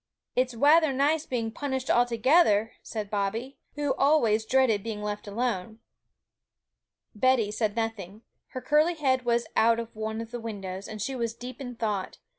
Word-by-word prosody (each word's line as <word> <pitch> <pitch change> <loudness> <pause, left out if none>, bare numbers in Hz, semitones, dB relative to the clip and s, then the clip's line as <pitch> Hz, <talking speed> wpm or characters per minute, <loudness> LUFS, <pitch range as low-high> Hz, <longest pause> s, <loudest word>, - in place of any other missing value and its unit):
'It's 250 -1 +1
wather 300 +5 +5
nice 290 +4 +1
being 230 -3 -2
punished 265 0 -3
all 240 0 +3
together,' 230 -2 +3
said 210 -2 -6
Bobby, 220 +6 -2 0.2
who 290 -2 0
always 235 -7 +3
dreaded 255 -6 +3
being 210 -1 -5
left 210 0 -4
alone. 220 -1 -2 1.4
Betty 230 -1 +2
said 215 -1 -1
nothing; 225 -2 -4 0.2
her 255 - -7
curly 305 +5 +3
head 260 -5 +1
was 235 0 +1
out 230 +1 +4
of 230 -1 -7
one 220 0 -4
of 230 0 -7
the 240 - -5
windows, 195 -4 -6
and 215 -1 -7
she 270 - -3
was 230 -2 -2
deep 250 +3 -9
in 245 -2 -6
thought. 210 -4 -3
230 Hz, 165 wpm, -27 LUFS, 215-260 Hz, 1.4 s, wather